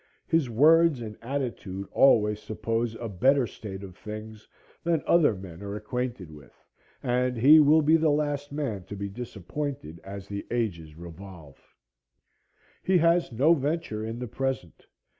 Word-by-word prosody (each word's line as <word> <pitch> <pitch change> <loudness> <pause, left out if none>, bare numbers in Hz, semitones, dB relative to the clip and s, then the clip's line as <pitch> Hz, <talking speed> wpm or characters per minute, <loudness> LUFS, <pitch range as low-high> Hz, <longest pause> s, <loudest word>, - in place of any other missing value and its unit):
His 165 -6 +1
words 155 +4 +5
and 110 -2 -7
attitude 115 -7 -4
always 105 -6 +4
suppose 115 +2 -2
a 115 - -5
better 130 +7 +2
state 100 -2 -8
of 95 -2 -10
things 110 +1 -9 0.4
than 165 -2 +1
other 160 -10 +4
men 90 -2 -10
are 100 0 -5
acquainted 110 -4 -4
with, 75 -4 -16 0.4
and 125 0 0
he 145 +7 +8
will 155 +1 +5
be 160 +2 +5
the 160 -1 +2
last 145 -1 -1
man 135 -10 -3
to 100 - -8
be 100 0 -4
disappointed 110 - -6
as 100 0 -8
the 100 0 -5
ages 85 -10 -3
revolve. 85 -3 -12 1.2
He 190 -1 +3
has 170 -1 +3
no 140 +9 +4
venture 145 -7 -2
in 115 +1 -5
the 125 0 -5
present. 130 -7 -4
115 Hz, 150 wpm, -27 LUFS, 100-145 Hz, 1.2 s, he